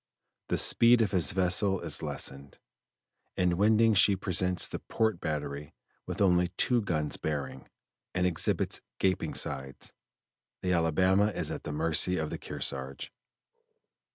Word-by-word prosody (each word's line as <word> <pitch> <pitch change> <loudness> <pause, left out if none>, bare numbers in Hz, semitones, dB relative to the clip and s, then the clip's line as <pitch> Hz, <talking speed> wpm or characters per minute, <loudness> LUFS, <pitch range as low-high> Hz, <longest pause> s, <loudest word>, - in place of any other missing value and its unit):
The - - -1
speed 115 0 +5
of 105 - -2
his 85 -8 +3
vessel 95 +1 +2
is - - -2
lessened; 70 +1 -5 0.8
in 90 -1 +1
winding 110 +3 +3
she 100 0 +4
presents 90 -1 +1
the - - -6
port 110 -5 -1
battery 75 -2 -5 0.3
with - - -5
only 90 -2 +3
two 125 -2 +2
guns 75 -7 -2
bearing, 70 -4 -5 0.5
and 90 0 +1
exhibits 90 -3 -1 0.2
gaping 95 -1 -1
sides. 70 -1 -4 0.7
The 90 -1 0
Alabama 95 +4 +2
is 105 - -3
at - - -7
the - - -4
mercy 80 +4 +2
of 80 -1 -3
the - - -5
Kearsarge. 65 0 -4
90 Hz, 135 wpm, -29 LUFS, 75-95 Hz, 0.8 s, speed